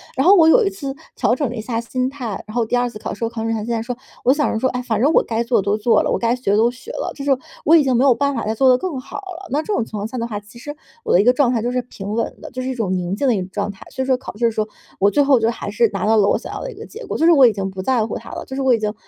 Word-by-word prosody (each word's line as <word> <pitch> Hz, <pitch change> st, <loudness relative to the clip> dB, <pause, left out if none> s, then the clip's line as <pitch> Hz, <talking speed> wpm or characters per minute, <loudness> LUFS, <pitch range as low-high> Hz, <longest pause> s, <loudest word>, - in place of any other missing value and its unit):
然 265 Hz, -, +1 dB
后 395 Hz, -, +8 dB
我 325 Hz, -4 st, +6 dB
有 465 Hz, +9 st, +6 dB
一 -, -, +2 dB
次 280 Hz, -9 st, -6 dB, 0.2 s
调 240 Hz, -, +2 dB
整 270 Hz, -3 st, -1 dB
了 245 Hz, -, -6 dB
一 -, -, -5 dB
下 225 Hz, 0 st, -3 dB
心 255 Hz, +2 st, -2 dB
态， 250 Hz, -7 st, -5 dB
然 215 Hz, -, -9 dB
后 235 Hz, -, +1 dB
第 220 Hz, -, -1 dB
2 245 Hz, 0 st, +1 dB
次 215 Hz, -, -9 dB
考 -, -, -5 dB
试， -, -, -7 dB
我 225 Hz, -, -2 dB
考 230 Hz, -1 st, -6 dB
试 225 Hz, -, -2 dB
之 -, -, +1 dB
前 215 Hz, -, -4 dB
竟 235 Hz, -, -2 dB
然 225 Hz, -, -1 dB
说， 245 Hz, +1 st, -4 dB, 0.3 s
我 255 Hz, -, +5 dB
想 295 Hz, 0 st, 0 dB
着 -, -, -1 dB
说， 260 Hz, +4 st, +1 dB
哎， 250 Hz, 0 st, -3 dB
反 225 Hz, -4 st, -1 dB
正 290 Hz, +5 st, +4 dB
我 -, -, +5 dB
该 230 Hz, 0 st, -2 dB
做 235 Hz, -3 st, +2 dB
的 -, -, -10 dB
都 200 Hz, +1 st, +2 dB
做 220 Hz, +2 st, +3 dB
了， -, -, -1 dB
我 -, -, +1 dB
该 235 Hz, 0 st, +1 dB
学 250 Hz, -5 st, -2 dB
的 205 Hz, -, +3 dB
都 230 Hz, +2 st, +3 dB
学 255 Hz, -, -11 dB
了， -, -, -3 dB
就 -, -, -20 dB
是 275 Hz, -, -6 dB
说 275 Hz, -2 st, +3 dB, 0.3 s
我 320 Hz, -, +6 dB
已 320 Hz, -, +6 dB
经 260 Hz, -2 st, +1 dB
没 240 Hz, -, +3 dB
有 255 Hz, -, +5 dB
办 280 Hz, +2 st, 0 dB
法 235 Hz, -, -3 dB
再 220 Hz, +1 st, -1 dB
做 265 Hz, +3 st, +4 dB
得 250 Hz, -, +6 dB
更 335 Hz, -2 st, -4 dB
好 255 Hz, -, -8 dB
了， 375 Hz, -2 st, -8 dB
那 295 Hz, +3 st, +1 dB
这 420 Hz, -, -3 dB
种 -, -, +1 dB
情 225 Hz, -, -13 dB
况 205 Hz, -, -3 dB
下 250 Hz, +3 st, -7 dB
的 230 Hz, -, -2 dB
话 215 Hz, -3 st, -4 dB
呢， 205 Hz, -, -8 dB
其 235 Hz, -, -15 dB
实 290 Hz, +5 st, -7 dB, 0.3 s
我 -, -, -2 dB
的 -, -, +6 dB
一 200 Hz, -, +5 dB
个 245 Hz, -, +5 dB
状 255 Hz, -1 st, +2 dB
态 230 Hz, -3 st, 0 dB
就 240 Hz, -, -1 dB
是 250 Hz, 0 st, 0 dB
平 205 Hz, -4 st, -7 dB
稳 230 Hz, +1 st, -1 dB
的， -, -, -8 dB
就 255 Hz, -1 st, -5 dB
是 255 Hz, -, -3 dB
一 260 Hz, -, -1 dB
种 200 Hz, -6 st, -1 dB
宁 180 Hz, +1 st, -2 dB
静 275 Hz, +6 st, 0 dB
的 245 Hz, -, +3 dB
一 -, -, -1 dB
种 180 Hz, -, -7 dB
状 205 Hz, +1 st, -2 dB
态， 195 Hz, -, -14 dB
所 -, -, -4 dB
以 -, -, -4 dB
说 260 Hz, -, +3 dB
考 255 Hz, -, -9 dB
试 235 Hz, -, +1 dB
的 230 Hz, -, +3 dB
时 215 Hz, -, -1 dB
候 215 Hz, -, -2 dB, 0.3 s
我 200 Hz, +1 st, +4 dB
最 290 Hz, -, +3 dB
后 275 Hz, -3 st, +4 dB
就 225 Hz, 0 st, +2 dB
还 225 Hz, -, -6 dB
是 220 Hz, +2 st, +2 dB
拿 -, -, -2 dB
到 220 Hz, +1 st, +3 dB
了 200 Hz, -, +4 dB
我 -, -, +3 dB
想 -, -, -8 dB
要 -, -, -5 dB
的 -, -, -5 dB
一 -, -, -12 dB
个 445 Hz, +3 st, -9 dB
结 465 Hz, +2 st, -10 dB
果， -, -, -3 dB
就 325 Hz, -, +2 dB
是 340 Hz, -, +7 dB
我 275 Hz, -5 st, +7 dB
已 225 Hz, -, +2 dB
经 195 Hz, -1 st, -3 dB
不 190 Hz, 0 st, -6 dB
在 235 Hz, 0 st, +1 dB
乎 225 Hz, -, -4 dB
它 -, -, -11 dB
了， -, -, -6 dB
就 265 Hz, -, -7 dB
是 275 Hz, -, -2 dB
我 260 Hz, -2 st, +4 dB
已 230 Hz, -, +2 dB
经 210 Hz, 0 st, -2 dB
240 Hz, 430 characters per minute, -20 LUFS, 220-270 Hz, 0.3 s, 后